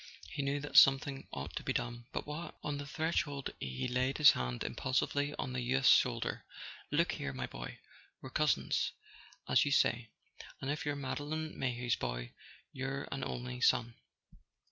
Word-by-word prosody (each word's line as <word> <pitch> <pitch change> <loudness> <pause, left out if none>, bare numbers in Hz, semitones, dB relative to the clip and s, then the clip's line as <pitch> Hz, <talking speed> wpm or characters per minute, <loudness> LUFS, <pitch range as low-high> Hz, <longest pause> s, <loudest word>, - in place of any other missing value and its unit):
He - - -2
knew 140 +1 0
that 145 - -1
something 135 0 +6
ought 70 0 -6
to - - -2
be - - -1
done—but 120 +1 -4
what? 150 +3 -6
On 145 -1 -2
the 145 - -6
threshold 150 -3 -1
he 65 - -3
laid 125 +2 0
his 150 -2 +9
hand 60 -1 -3
impulsively 145 +3 0
on 130 - -3
the 125 - -1
youth's 130 +2 +3
shoulder. 120 -3 +2 0.5
"Look - - +2
here, 70 - -4
my 65 -1 -3
boy, - - -7 0.4
we're 130 - -9
cousins, 150 0 +1 0.5
as - - +5
you - - 0
say, 115 -4 +2 0.5
and 135 - -2
if 150 0 -3
you're 145 - 0
Madeline 145 +3 -3
Mayhew's 120 -2 0
boy - - -4 0.4
you're 135 +1 -3
an 135 -1 -3
only 125 0 -4
son. 120 -2 +3
130 Hz, 165 wpm, -34 LUFS, 120-145 Hz, 0.5 s, his